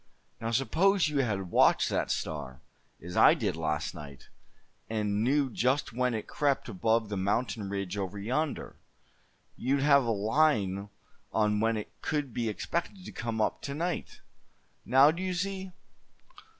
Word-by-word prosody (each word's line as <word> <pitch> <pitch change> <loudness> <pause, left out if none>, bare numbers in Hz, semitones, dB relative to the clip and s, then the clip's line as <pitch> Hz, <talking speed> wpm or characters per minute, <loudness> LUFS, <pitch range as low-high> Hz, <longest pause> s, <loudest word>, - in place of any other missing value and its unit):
Now 115 - -3
suppose 160 - +2
you 145 -2 0
had 100 -8 -1
watched - - +4
that - - -1
star, 65 0 -4 0.4
as 90 +1 -7
I - - +7
did - - -1
last 80 -2 -2
night, 70 -2 -11 0.6
and 105 -1 0
knew 135 +1 +2
just 130 +2 0
when 125 0 0
it 110 - -4
crept 140 -2 0
above 110 +2 +1
that 105 - -3
mountain 100 +1 -1
ridge 100 0 -3
over 100 +1 -4
yonder; 130 +9 -2 0.8
you'd 135 +2 0
have 140 -1 +5
a - - -1
line 105 -3 +1 0.4
on 105 -1 +2
when 115 +1 +1
it 105 - -6
could 145 -5 -2
be 115 -1 -1
expected 170 - -4
to - - -7
come 115 -2 -4
up 110 - 0
to 140 - -5
night. 170 +3 -3 0.6
Now 135 +3 +6
do 170 +3 -6
you 185 -1 -2
see?" 190 +1 -3
115 Hz, 155 wpm, -29 LUFS, 105-145 Hz, 0.8 s, I